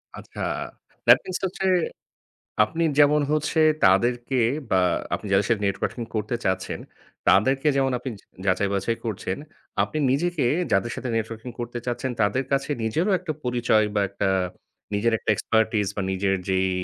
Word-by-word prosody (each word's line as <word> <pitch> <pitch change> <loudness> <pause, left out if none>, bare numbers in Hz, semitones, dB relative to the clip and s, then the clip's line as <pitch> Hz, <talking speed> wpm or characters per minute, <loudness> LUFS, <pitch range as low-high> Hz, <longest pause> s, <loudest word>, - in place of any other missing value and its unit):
আচ্ছা, - - -11 0.7
that - - +9
means 185 - -3
এটা 190 - 0
হচ্ছে 190 0 -2 1.0
আপনি 165 +9 -3 0.2
যেমন 150 +1 +6
হচ্ছে 155 +1 +1 0.2
তাদেরকে 120 +7 +3 0.3
বা 95 - +4 0.3
আপনি - - -5
যাদের 95 +1 +3
সাথে 110 -3 +1
নেটওয়ার্কিং 110 +4 -2
করতে 110 +2 -1
চাচ্ছেন, 95 0 -1 0.5
তাদেরকে 135 +8 +4
যেমন 135 -1 +2
আপনি 130 - -5
জ - - -34 0.2
যাচাই-বাছাই 100 +4 +1
করছেন, 95 -3 -3 0.4
আপনি 155 - -2
নিজেকে 165 +1 +1 0.3
যাদের 120 0 +2
সাথে 130 - -4
নেটওয়ার্কিং 115 +2 -4
করতে 120 0 -4
চাচ্ছেন 125 +1 -2
তাদের 115 +6 +1
কাছে 140 +2 0
নিজেরও 165 - +1
একটা 170 -3 -4
পরিচয় 120 -3 +2
বা 100 - +2
একটা 100 0 -1 0.7
নিজের 115 +3 +2
একটা - - -1
এক্সপার্টাইজ 110 -1 +1
বা 100 - -1
নিজের 95 +1 +1
যেই 95 0 +2
120 Hz, 150 wpm, -24 LUFS, 100-135 Hz, 1.0 s, that